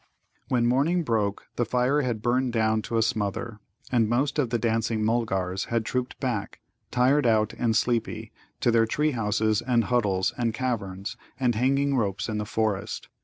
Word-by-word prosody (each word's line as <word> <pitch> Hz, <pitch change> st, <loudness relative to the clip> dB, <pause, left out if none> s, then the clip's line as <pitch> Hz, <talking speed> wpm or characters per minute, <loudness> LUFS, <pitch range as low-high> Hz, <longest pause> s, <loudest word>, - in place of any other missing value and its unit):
When 120 Hz, -2 st, +1 dB
morning 145 Hz, +9 st, +2 dB
broke, 105 Hz, -6 st, -1 dB
the 120 Hz, -, +2 dB
fire 125 Hz, +5 st, +1 dB
had 120 Hz, -5 st, -2 dB
burned 125 Hz, 0 st, +1 dB
down 110 Hz, -1 st, +2 dB
to 115 Hz, -, 0 dB
a 115 Hz, -, +4 dB
smother, 105 Hz, +1 st, -2 dB, 0.3 s
and 115 Hz, -4 st, +3 dB
most 135 Hz, +5 st, +1 dB
of 130 Hz, -5 st, +1 dB
the 120 Hz, -, +1 dB
dancing 115 Hz, -1 st, 0 dB
Mulgars 95 Hz, -5 st, 0 dB
had 115 Hz, -2 st, -1 dB
trooped 125 Hz, +1 st, -3 dB
back, 125 Hz, -7 st, -3 dB, 0.3 s
tired 130 Hz, +2 st, +3 dB
out 110 Hz, -1 st, +2 dB
and 115 Hz, -2 st, 0 dB
sleepy, 115 Hz, -1 st, 0 dB, 0.3 s
to 120 Hz, -, +3 dB
their 115 Hz, -1 st, +3 dB
tree 150 Hz, +6 st, +1 dB
houses 110 Hz, -3 st, +1 dB
and 120 Hz, -1 st, +2 dB
huddles 100 Hz, -5 st, +1 dB
and 115 Hz, -2 st, 0 dB
caverns 100 Hz, -7 st, -3 dB, 0.2 s
and 125 Hz, -2 st, +2 dB
hanging 135 Hz, +4 st, +1 dB
ropes 105 Hz, -4 st, -1 dB
in 110 Hz, -1 st, -2 dB
the 105 Hz, -, -2 dB
forest. 110 Hz, -3 st, -2 dB
115 Hz, 170 wpm, -26 LUFS, 110-125 Hz, 0.3 s, a